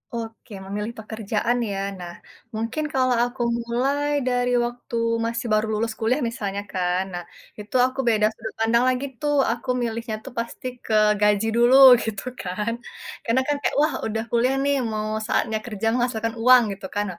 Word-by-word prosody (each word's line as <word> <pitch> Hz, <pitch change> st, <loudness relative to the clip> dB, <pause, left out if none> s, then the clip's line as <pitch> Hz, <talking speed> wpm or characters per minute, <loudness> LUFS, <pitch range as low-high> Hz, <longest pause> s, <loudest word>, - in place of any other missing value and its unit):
Oke, 225 Hz, -1 st, -7 dB
memilih 210 Hz, +3 st, -4 dB
pekerjaan 220 Hz, +2 st, -2 dB
ya. 195 Hz, -1 st, -3 dB, 0.2 s
Nah, 175 Hz, -1 st, -7 dB, 0.4 s
mungkin 230 Hz, +7 st, -2 dB
kalau 255 Hz, -1 st, +2 dB
aku 245 Hz, +1 st, -4 dB, 0.2 s
mulai 270 Hz, +5 st, 0 dB, 0.2 s
dari 245 Hz, 0 st, +1 dB
waktu 240 Hz, 0 st, -7 dB, 0.3 s
masih 230 Hz, +1 st, -3 dB
baru 215 Hz, +1 st, +3 dB
lulus 220 Hz, +1 st, -1 dB
kuliah 230 Hz, +4 st, +1 dB
misalnya 200 Hz, -3 st, -4 dB
kan. 180 Hz, 0 st, 0 dB
Nah, 175 Hz, 0 st, -4 dB, 0.4 s
itu 210 Hz, +3 st, -9 dB
aku 260 Hz, +1 st, -4 dB
beda 215 Hz, -2 st, +3 dB
sudut 220 Hz, -, -7 dB
pandang 230 Hz, +2 st, +3 dB
lagi 255 Hz, +2 st, -1 dB, 0.2 s
tuh, 295 Hz, -1 st, +1 dB, 0.2 s
aku 235 Hz, +2 st, -5 dB
milihnya 230 Hz, -1 st, -3 dB
tuh 270 Hz, -, -9 dB
pasti 235 Hz, +2 st, -5 dB, 0.2 s
ke 220 Hz, -, -2 dB, 0.3 s
gaji 210 Hz, +1 st, +3 dB
dulu 240 Hz, +2 st, +5 dB, 0.3 s
gitu 205 Hz, -3 st, -4 dB, 0.2 s
kan. 210 Hz, +5 st, -2 dB, 0.5 s
Karena 235 Hz, +3 st, +2 dB
kan 295 Hz, -, +1 dB
kayak -, -, -1 dB
wah 305 Hz, -1 st, +2 dB
udah 220 Hz, 0 st, -2 dB
kuliah 245 Hz, +3 st, +2 dB
nih, 285 Hz, 0 st, +2 dB, 0.2 s
mau 215 Hz, 0 st, -2 dB, 0.2 s
saatnya 220 Hz, -2 st, 0 dB
kerja 225 Hz, -2 st, -3 dB
menghasilkan 230 Hz, -2 st, -1 dB
uang 250 Hz, +1 st, +7 dB
gitu 195 Hz, 0 st, -10 dB
kan. 205 Hz, 0 st, 0 dB
230 Hz, 170 wpm, -23 LUFS, 215-245 Hz, 0.5 s, uang